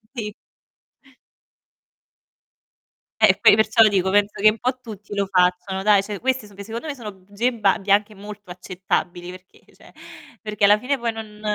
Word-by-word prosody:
Sì. 210 Hz, -4 st, -5 dB, 2.9 s
Eh, -, -, +5 dB
poi -, -, +7 dB
perciò 220 Hz, +1 st, +4 dB
lo 215 Hz, -, +5 dB
dico, 190 Hz, -2 st, 0 dB
penso 205 Hz, 0 st, +1 dB
che 215 Hz, -, +6 dB
un 215 Hz, +1 st, -4 dB
po' 255 Hz, +1 st, -2 dB
tutti 210 Hz, -4 st, -11 dB
lo 200 Hz, -1 st, -1 dB
facciano, 180 Hz, +1 st, 0 dB
dai. 205 Hz, -1 st, +4 dB
Cioè, 200 Hz, 0 st, -7 dB
queste 260 Hz, -3 st, -1 dB
so 205 Hz, -, -18 dB
che 200 Hz, -, -9 dB
secondo 230 Hz, +8 st, -7 dB
me 295 Hz, -, -3 dB, 0.2 s
bugie 205 Hz, +6 st, -3 dB
ba 210 Hz, -4 st, +2 dB
bianche 195 Hz, 0 st, -4 dB, 0.2 s
anche -, -, -18 dB
molto 205 Hz, 0 st, -12 dB
accettabili 180 Hz, -1 st, -4 dB
perché 185 Hz, 0 st, -16 dB
cioè, -, -, -19 dB, 0.5 s
perché 210 Hz, -1 st, -5 dB
alla 205 Hz, +1 st, +6 dB
fine 275 Hz, +5 st, -2 dB
poi 235 Hz, -2 st, -2 dB
non 215 Hz, -1 st, -10 dB
205 Hz, 170 wpm, -21 LUFS, 195-220 Hz, 2.9 s, poi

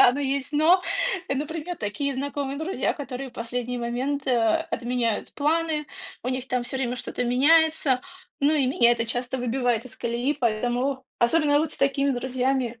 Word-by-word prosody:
да, 245 Hz, -, +8 dB
но 285 Hz, -, -3 dB
есть 275 Hz, +1 st, -1 dB
"но", 325 Hz, +5 st, +5 dB, 0.5 s
например, 320 Hz, +4 st, -4 dB
такие 260 Hz, +7 st, -2 dB
знакомые 280 Hz, 0 st, -3 dB
друзья, 320 Hz, +5 st, -1 dB
которые 270 Hz, -2 st, -6 dB
в -, -, -28 dB
последний 245 Hz, +1 st, -3 dB
момент, 255 Hz, +4 st, -2 dB
э, 260 Hz, -, +2 dB, 0.4 s
отменяют 240 Hz, -3 st, -1 dB
планы, 310 Hz, 0 st, 0 dB, 0.4 s
у 250 Hz, -, -3 dB
них 255 Hz, 0 st, -2 dB
там 250 Hz, -1 st, 0 dB
всё 245 Hz, +2 st, -4 dB
время 250 Hz, -1 st, -1 dB
что-то 250 Hz, -, -3 dB
меняется, 285 Hz, +1 st, +4 dB, 0.4 s
ну 285 Hz, +2 st, +4 dB
и 280 Hz, -4 st, +2 dB
меня 240 Hz, -2 st, +4 dB
это 230 Hz, -1 st, 0 dB
часто 245 Hz, +2 st, -2 dB
выбивает 245 Hz, -1 st, 0 dB
из 255 Hz, -, -11 dB
колеи, 240 Hz, +5 st, -1 dB
поэтому 245 Hz, +4 st, 0 dB
особенно 290 Hz, +4 st, +3 dB
вот 315 Hz, -1 st, -2 dB
с -, -, -8 dB
такими 275 Hz, 0 st, +2 dB
друзьями, 255 Hz, -1 st, -1 dB
265 Hz, 170 wpm, -25 LUFS, 245-285 Hz, 0.5 s, да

